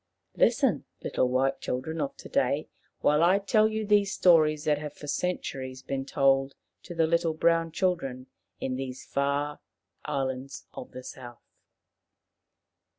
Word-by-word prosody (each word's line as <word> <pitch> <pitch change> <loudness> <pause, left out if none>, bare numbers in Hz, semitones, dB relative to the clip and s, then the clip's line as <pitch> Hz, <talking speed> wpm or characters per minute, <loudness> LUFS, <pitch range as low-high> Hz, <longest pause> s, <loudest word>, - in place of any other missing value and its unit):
Listen, - - +3 0.2
little 125 - +1
white 130 +2 +1
children 155 +6 -3
of 140 - -3
to - - -10
day, - - +1 0.3
while 150 +1 +4
I 180 +3 +5
tell 215 +2 +3
you 220 0 -2
these 205 -1 +3
stories 155 -4 +4
that 150 -2 +2
have 150 -1 -6
for 150 - -11
centuries 135 -5 -3
been 135 0 -3
told 135 0 +2 0.3
to 175 - -9
the 165 -1 +3
little 165 0 +1
brown 165 0 +2
children 160 -8 -1 0.3
in 130 -1 -2
these 130 -1 -6
far 140 +1 -1 0.4
islands 135 -2 -3
of - - -8
the 130 - -9
South. 120 -2 -10
145 Hz, 145 wpm, -28 LUFS, 135-170 Hz, 0.4 s, I